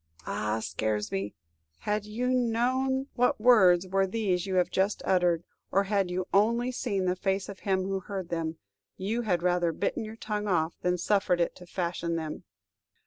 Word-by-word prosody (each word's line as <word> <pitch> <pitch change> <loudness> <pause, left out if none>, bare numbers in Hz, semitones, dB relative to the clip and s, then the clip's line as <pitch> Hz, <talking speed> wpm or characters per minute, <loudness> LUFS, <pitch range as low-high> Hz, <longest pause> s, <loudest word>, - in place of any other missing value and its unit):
Ah, 105 +1 -1
Scaresby, 105 -2 -2 0.5
had 210 0 -1
you 235 +4 -2
known 255 +2 +1
what 250 -2 +2
words 190 -7 +6
were 195 +1 +2
these 190 -3 -1
you 190 - -1
have 180 -1 +2
just 195 +2 0
uttered, 175 -3 +2 0.3
or 195 - +3
had 195 -2 0
you 180 +1 -2
only 235 +5 +3
seen 205 -7 -1
the 180 0 +1
face 190 +1 -1
of 200 -2 -8
him 190 -2 0
who 195 0 -1
heard 190 -2 -6
them, 165 -1 -2 0.4
you 215 +5 -1
had 180 -7 0
rather 175 -1 +2
bitten 200 +6 -2
your 220 +1 -7
tongue 210 -2 -3
off 165 -4 +1
than 180 0 +1
suffered 190 -1 +2
it 170 - 0
to 180 - -13
fashion 170 -1 -2
them! 160 -2 -5
190 Hz, 175 wpm, -28 LUFS, 175-215 Hz, 0.5 s, words